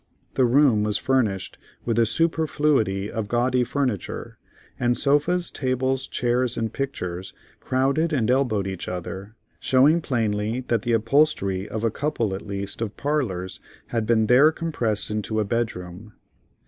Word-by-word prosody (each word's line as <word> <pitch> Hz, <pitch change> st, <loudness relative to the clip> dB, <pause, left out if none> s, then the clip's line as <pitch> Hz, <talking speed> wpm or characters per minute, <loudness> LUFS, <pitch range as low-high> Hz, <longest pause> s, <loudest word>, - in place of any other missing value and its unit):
The 130 Hz, -, +3 dB
room 125 Hz, -3 st, +4 dB
was 105 Hz, 0 st, 0 dB
furnished 115 Hz, -8 st, 0 dB, 0.3 s
with 115 Hz, -1 st, +1 dB
a 115 Hz, -, +4 dB
superfluity 145 Hz, -, +1 dB
of 110 Hz, -3 st, -3 dB
gaudy 125 Hz, +2 st, +2 dB
furniture; 125 Hz, -6 st, -3 dB, 0.4 s
and 120 Hz, 0 st, +2 dB
sofas, 155 Hz, +5 st, +1 dB
tables, 130 Hz, 0 st, -1 dB
chairs 125 Hz, 0 st, 0 dB
and 115 Hz, -1 st, -2 dB
pictures, 95 Hz, -10 st, -4 dB, 0.3 s
crowded 140 Hz, +6 st, +1 dB
and 125 Hz, -6 st, +1 dB
elbowed 125 Hz, -7 st, +1 dB
each 95 Hz, -2 st, -5 dB
other, 95 Hz, +4 st, -6 dB, 0.2 s
showing 145 Hz, +6 st, +4 dB
plainly 110 Hz, -3 st, -1 dB
that 115 Hz, -3 st, +2 dB
the 120 Hz, +2 st, -1 dB
upholstery 115 Hz, -5 st, +2 dB
of 110 Hz, 0 st, -4 dB
a 115 Hz, -, +2 dB
couple, 120 Hz, -7 st, -1 dB
at 95 Hz, -, -4 dB
least, 100 Hz, +1 st, -5 dB
of 110 Hz, -2 st, -4 dB
parlors 110 Hz, -12 st, -2 dB, 0.3 s
had 115 Hz, -2 st, -1 dB
been 110 Hz, -1 st, +3 dB
there 130 Hz, +8 st, +6 dB
compressed 125 Hz, -12 st, -2 dB
into 105 Hz, +1 st, -2 dB
a 105 Hz, -, +1 dB
bedroom. 105 Hz, -2 st, -4 dB
115 Hz, 145 wpm, -24 LUFS, 105-135 Hz, 0.4 s, there